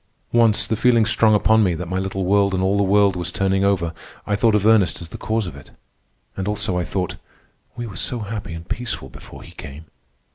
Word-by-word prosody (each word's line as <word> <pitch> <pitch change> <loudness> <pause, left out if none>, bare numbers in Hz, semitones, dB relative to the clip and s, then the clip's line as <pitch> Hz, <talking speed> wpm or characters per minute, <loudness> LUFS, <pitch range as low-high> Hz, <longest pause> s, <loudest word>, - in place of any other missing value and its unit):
Once, 115 -3 +4
the 110 - -1
feeling 115 0 +3
strong 110 -1 +3
upon 110 +1 +4
me 90 -4 +1
that 90 +2 -5
my 95 +2 -2
little 95 0 -3
world 100 0 +2
and 95 - 0
all 95 +1 +2
the 100 - +2
world 100 0 +3
was 90 -1 -3
turning 95 +1 0
over, 90 -4 +1 0.3
I 105 - 0
thought 110 +1 +3
of 105 -1 +1
Ernest 110 -4 +4
as 85 - -8
the - - -8
cause 110 -1 -1
of 85 - -7
it; 70 - -13 0.7
and 95 0 -4
also 105 -3 -1
I 90 - 0
thought, 90 +1 -3 0.6
"We 120 - -5
were 105 -5 -9
so 120 +4 -2
happy 105 -5 -5
and 80 0 -9
peaceful 115 - -5
before - - -12
he - - -13
came!" 70 +4 -10
100 Hz, 225 wpm, -21 LUFS, 90-110 Hz, 0.7 s, Once